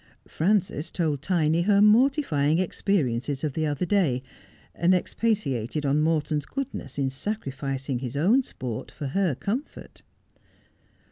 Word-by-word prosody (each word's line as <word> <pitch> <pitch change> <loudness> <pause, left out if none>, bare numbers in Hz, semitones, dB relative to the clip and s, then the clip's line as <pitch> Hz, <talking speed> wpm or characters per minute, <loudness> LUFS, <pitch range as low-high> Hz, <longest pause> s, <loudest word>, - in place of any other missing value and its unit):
Frances 185 -3 0
told 155 -6 -1
Tiny 165 -1 +2
her 200 +2 +3
mortifying 210 - +4
experiences 145 - -1
of 150 -3 -1
the 155 +1 0
other 145 +4 -1
day, 165 -10 +1 0.5
and 175 +2 +3
expatiated 150 - -1
on 145 +2 +2
Morton's 155 -2 0
goodness 270 - -5
in 135 -2 0
sacrificing 135 - -3
his 130 +1 -5
own 205 - +4
sport 125 - -6
for 145 - -6
her 180 -1 +1
comfort. 235 - -5
155 Hz, 125 wpm, -26 LUFS, 140-200 Hz, 0.5 s, mortifying